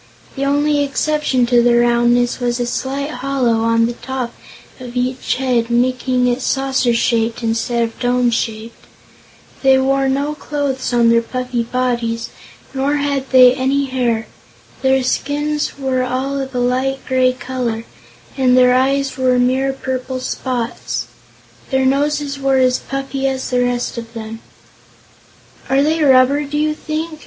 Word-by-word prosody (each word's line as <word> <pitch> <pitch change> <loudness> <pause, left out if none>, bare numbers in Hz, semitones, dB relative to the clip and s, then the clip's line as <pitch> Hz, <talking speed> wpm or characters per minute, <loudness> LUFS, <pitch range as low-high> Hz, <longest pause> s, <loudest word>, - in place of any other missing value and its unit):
The 275 - -3
only 290 +1 +2
exception 280 -2 0
to 240 0 +4
the 240 0 +4
roundness 240 +1 +2
was 245 0 -1
a 245 - 0
slight 270 +4 -3
hollow 250 -3 0
on 230 0 +2
the 240 - -2
top 255 -1 -5 0.5
of 250 -1 -9
each 255 +1 -1
head, 245 -3 0
making 250 +1 +1
it 245 +1 0
saucer 270 -2 +1
shaped 230 0 0
instead 230 +1 0
of 230 0 -5
dome 245 -1 +1
shaped. 225 0 -4 0.7
They 265 -1 +5
wore 270 0 +1
no 280 +3 -1
clothes 285 -4 -3
on 235 -1 +3
their 230 0 +4
puffy 250 0 -3
bodies, 235 -1 -2 0.4
nor 275 +2 0
had 280 -2 -1
they 255 -1 +7
any 275 +2 0
hair. 245 -4 -1 0.6
Their 265 0 +2
skins 295 +4 -1
were 265 -2 -1
all 260 +2 -2
of 265 -1 -5
a - - 0
light 260 +2 -1
gray 255 -1 +3
color, 250 -3 -4 0.5
and 255 -2 +3
their 250 0 +5
eyes 270 +1 +1
were 255 -1 +3
mere 260 +2 +2
purple 260 -1 -4
spots. 245 - -3 0.6
Their 265 0 +1
noses 285 +1 0
were 270 -1 +2
as 255 -1 +3
puffy 275 0 -3
as 265 -1 -3
the 250 0 +2
rest 245 -1 -2
of 230 0 -10
them. 225 0 -7 1.3
"Are 270 +1 +3
they 315 +2 +1
rubber, 270 +1 +4
do 290 +1 -4
you 305 0 +1
think?" 310 +1 -5
255 Hz, 150 wpm, -17 LUFS, 245-275 Hz, 1.3 s, they